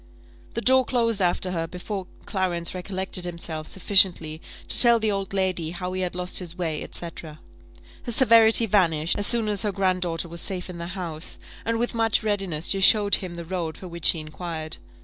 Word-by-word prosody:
The 230 - -1
door 260 +1 +5
closed 230 -4 0
after 180 +1 +1
her 165 -2 -2
before 185 +2 -6 0.2
Clarence 175 -3 -1
recollected 190 0 -3
himself 170 -3 -5
sufficiently 180 -5 +3 0.3
to - - +6
tell 235 -1 +7
the 220 -1 0
old 195 -1 -3
lady 185 -4 -1
how 180 +2 -5
he 185 - -3
had 180 -1 -3
lost 180 0 0
his 175 -1 -7
way, 160 -4 -3
&c. 170 - -4
Her 155 -2 -11 0.7
severity 230 -2 +5
vanished, 170 -6 +2
as 205 - +1
soon 230 -2 +1
as 205 -2 -2
her 210 - -1
grand 190 -2 0
daughter 170 -1 -3
was 170 0 -6
safe 185 -1 -3
in 170 - -9
the 170 - -5
house, 165 -3 -5 0.3
and 230 0 0
with 240 +1 -2
much 225 -2 +1
readiness 195 -7 -2
she 195 - 0
showed 205 +1 +5
him 180 -3 -7
the 170 0 -7
road 170 -2 -4
for 185 - -9
which 170 -2 +4
he 165 - +2
inquired. 155 0 -5
185 Hz, 195 wpm, -24 LUFS, 170-205 Hz, 0.7 s, tell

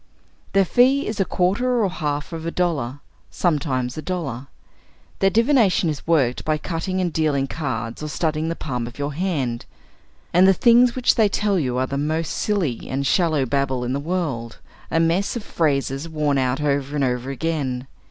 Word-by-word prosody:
Their 195 -1 +4
fee 260 - +3
is 215 -1 -4
a 195 - +3
quarter 225 +8 +1
or - - +3
half 150 -3 -3
of 165 0 -5
a - - +1
dollar. 145 -7 -1 0.3
Sometimes 140 -6 -1
a - - -4
dollar. 140 -8 -4 0.7
Their 195 - +4
divination 230 - +3
is 150 - -8
worked 140 -7 +2
by 155 0 +1
cutting 175 +4 -3
and 175 -3 -1
dealing 150 -4 +1
cards 125 -6 -4
or 155 - -3
studying 155 +1 -1
the 165 - -2
palm 125 -7 -4
of 120 - -10
your 145 0 -3
hand. 140 -9 -2 0.7
And 180 +2 +6
the 195 - +5
things 240 +3 +5
which 255 -1 +3
they 220 -3 +3
tell 200 -1 +1
you 125 -5 -1
are 130 - +1
the 140 +1 -3
most 155 +2 -1
silly 180 - -1
and 135 +1 -2
shallow 155 -4 +2
babble 130 0 0
in 125 +1 -2
the 140 - -1
world; 145 -8 -3 0.3
a 165 - +1
mess 170 +7 +1
of 235 - -4
phrases 140 -2 -1
worn 150 -3 0
out 130 +2 0
over 140 -1 0
and 145 - +1
over 125 0 -1
again. 135 -3 -2
155 Hz, 185 wpm, -22 LUFS, 135-180 Hz, 0.7 s, And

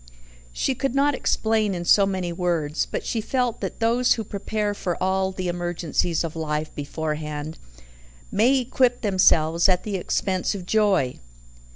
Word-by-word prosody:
She 160 - 0
could 270 0 -2
not 285 +1 +3
explain 220 -5 0
in 175 0 -4
so 200 +3 +5
many 185 -3 -2
words, 170 -4 -1
but - - -4
she 225 - -1
felt 245 0 -1
that - - -4
those 235 +2 +3
who 225 - -4
prepare 205 +1 -2
for 180 -3 -3
all 190 0 +1
the 185 -1 -4
emergencies 175 -1 -1
of 165 -1 -5
life 155 -1 -3
beforehand 150 +1 -4 0.7
may 245 +7 +4
equip 250 -1 +1
themselves 170 -4 +3
at 180 -1 +2
the 205 -3 -2
expense 185 +2 -1
of 185 -3 -7
joy. 195 -11 +1
190 Hz, 155 wpm, -24 LUFS, 165-220 Hz, 0.7 s, so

